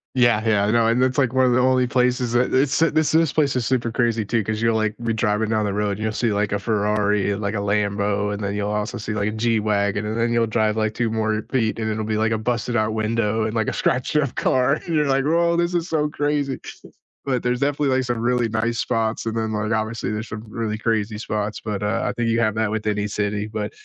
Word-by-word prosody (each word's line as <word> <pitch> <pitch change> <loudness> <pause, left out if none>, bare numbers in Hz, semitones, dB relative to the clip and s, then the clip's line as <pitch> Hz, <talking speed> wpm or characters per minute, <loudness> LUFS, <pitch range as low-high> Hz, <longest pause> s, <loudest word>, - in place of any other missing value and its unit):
Yeah, 120 -3 +4
yeah, 100 -2 +3
I 105 - +1
know, 115 -1 +3
and 120 +2 +2
that's, 130 +2 +2
like, 130 -2 +1
1 130 0 +4
of 125 - +3
the 125 - +3
only 130 0 +3
places 125 -1 +1
that 125 +1 +2
it's 135 +2 +2
this 155 -2 +2
this 160 -2 +3
place 145 -4 +1
is 125 - 0
super 120 -3 0
crazy, 115 -2 0
too, 115 0 0
'cause 110 +1 -2
you're 115 0 +2
like, 110 -1 0
be 115 -1 0
driving 110 -1 0
down 110 -1 +1
the 100 - -1
road 105 0 0
and 100 - -4
you'll 110 0 -1
see 110 -1 0
like 100 0 0
a 105 - +1
Ferrari, 105 -1 +1
and 100 +2 -3
like 100 +2 -1
a - - -2
Lambo, 100 0 0
and 100 0 -5
then 100 +1 -2
you'll 105 0 -2
also 105 0 -2
see 105 0 -4
like 105 0 0
a - - -3
G-Wagen 105 -2 0
and 110 +2 -2
then 120 0 +1
you'll 115 -1 +2
drive 110 -1 +1
like 110 0 0
2 115 -2 0
more 110 -1 -1
feet 115 -4 0
and 110 -1 -2
it'll 110 0 -2
be 110 -1 -1
like 110 +1 +1
a 110 - +1
busted 120 +1 -2
out 110 -1 +1
window 110 0 0
and 110 0 -2
like 110 -2 0
a - - -1
scratched 130 +3 0
up 140 -4 +1
car, 130 +3 +2
you're 155 -3 +1
like, 135 0 +2
"Woah, 170 +2 +2
this 175 +1 0
is 170 +1 0
so 150 -3 0
crazy." 145 -2 -1 0.7
But 130 -3 -1
there's 125 0 0
definitely, 140 0 +1
like, 130 - +1
some 120 -1 -1
really 120 0 +1
nice 115 +2 -1
spots 115 -2 -1
and, 115 0 -2
then, 110 -1 -1
like, 105 +1 -2
obviously 110 +1 -1
there's 110 +1 -4
some 105 0 -6
really 110 -1 -3
crazy 110 -1 -1
spots, 105 -1 -3
but, 105 -2 -3
uh, 105 -1 0
I - - -1
think 120 -1 -1
you 115 +1 +2
have 110 -2 +1
that 110 -1 0
with 110 -1 -3
any 105 0 0
city, 105 0 -2
but, 105 -1 -4
110 Hz, 260 wpm, -22 LUFS, 105-125 Hz, 0.7 s, Yeah